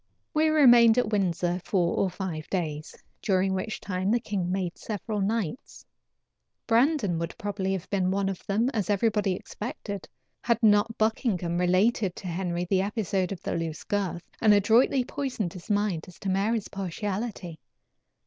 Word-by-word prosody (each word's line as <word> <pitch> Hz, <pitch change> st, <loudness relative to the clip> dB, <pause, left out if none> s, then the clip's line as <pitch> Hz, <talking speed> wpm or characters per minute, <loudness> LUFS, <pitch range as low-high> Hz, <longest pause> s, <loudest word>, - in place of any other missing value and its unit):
We 310 Hz, 0 st, +3 dB
remained 240 Hz, -6 st, +7 dB
at 235 Hz, -3 st, +1 dB
Windsor 180 Hz, -3 st, 0 dB
four 175 Hz, -4 st, +1 dB
or 195 Hz, -, +1 dB
five 175 Hz, -4 st, -5 dB
days, 155 Hz, -5 st, -3 dB, 0.3 s
during 190 Hz, -2 st, +1 dB
which 190 Hz, +4 st, -3 dB
time 185 Hz, 0 st, -2 dB
the 235 Hz, +3 st, +3 dB
king 190 Hz, -5 st, -2 dB
made 185 Hz, -2 st, -2 dB
several 210 Hz, 0 st, -4 dB
knights. 220 Hz, -, -3 dB, 0.8 s
Brandon 230 Hz, -, +2 dB
would 170 Hz, 0 st, -4 dB
probably 200 Hz, -2 st, -2 dB
have 185 Hz, -2 st, -4 dB
been 190 Hz, -2 st, +1 dB
one 195 Hz, +1 st, 0 dB
of 195 Hz, -2 st, -4 dB
them, 220 Hz, +5 st, +1 dB
as 210 Hz, -8 st, -2 dB
everybody 205 Hz, -1 st, +2 dB
expected, 205 Hz, -1 st, -7 dB, 0.3 s
had 235 Hz, -2 st, +2 dB
not 210 Hz, +1 st, +4 dB
Buckingham 205 Hz, -6 st, 0 dB
related 185 Hz, +2 st, +2 dB
to 190 Hz, -, -8 dB
Henry 175 Hz, 0 st, -2 dB
the 190 Hz, 0 st, +2 dB
episode 195 Hz, -2 st, -1 dB
of 190 Hz, -, -6 dB
the -, -, -2 dB
loose 165 Hz, -2 st, -4 dB
girth, 190 Hz, -4 st, -2 dB, 0.2 s
and 215 Hz, -2 st, +6 dB
adroitly 230 Hz, +6 st, +4 dB
poisoned 250 Hz, -12 st, -3 dB
his 180 Hz, +2 st, -11 dB
mind 205 Hz, -6 st, 0 dB
as 180 Hz, -, -13 dB
to 195 Hz, -, -2 dB
Mary's 200 Hz, +3 st, 0 dB
partiality. 195 Hz, -2 st, -4 dB
195 Hz, 160 wpm, -27 LUFS, 180-220 Hz, 0.8 s, remained